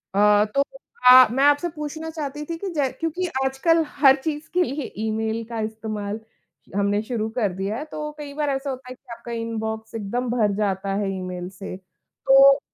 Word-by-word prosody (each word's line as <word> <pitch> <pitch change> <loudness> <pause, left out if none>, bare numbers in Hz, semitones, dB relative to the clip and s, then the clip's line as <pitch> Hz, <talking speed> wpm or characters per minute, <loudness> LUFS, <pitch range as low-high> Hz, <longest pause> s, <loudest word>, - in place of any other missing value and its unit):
अ, 210 +1 +5
तो 275 - +4 0.4
मैं 250 -2 +8
मैं 270 - +3
आपसे 290 +4 +4
पूछना 315 +1 -5
चाहती 295 -2 -5
थी 330 +1 -4
कि 395 - -5
जै 285 -4 +1
क्योंकि 330 +3 -1 0.2
आजकल 325 +5 +2 0.2
हर 270 -2 +8
चीज़ 305 0 -3
के 360 0 +4
लिए 285 -3 -3 0.2
ईमेल 220 +1 -1
का 230 -1 -4
इस्तेमाल 215 -1 -4 0.6
हमने 205 +1 +1
शुरू 220 -2 -2
कर 205 -6 +1
दिया 195 +4 -3
है। 295 - -5
तो 300 -1 -5
कई 290 -1 -7
बार 295 0 -1
ऐसा 275 +1 -2
होता 255 -1 -6
है 255 - -7
कि 255 -1 -17
आपका 235 +1 -9
इनबॉक्स 220 -1 -4
एकदम 235 +4 -2
भर 225 -4 +2
जाता 195 -2 -1
है 200 -1 -1
ईमेल 180 -1 -5
से 195 - -6
तो 270 +8 +4
245 Hz, 190 wpm, -23 LUFS, 215-290 Hz, 0.6 s, मैं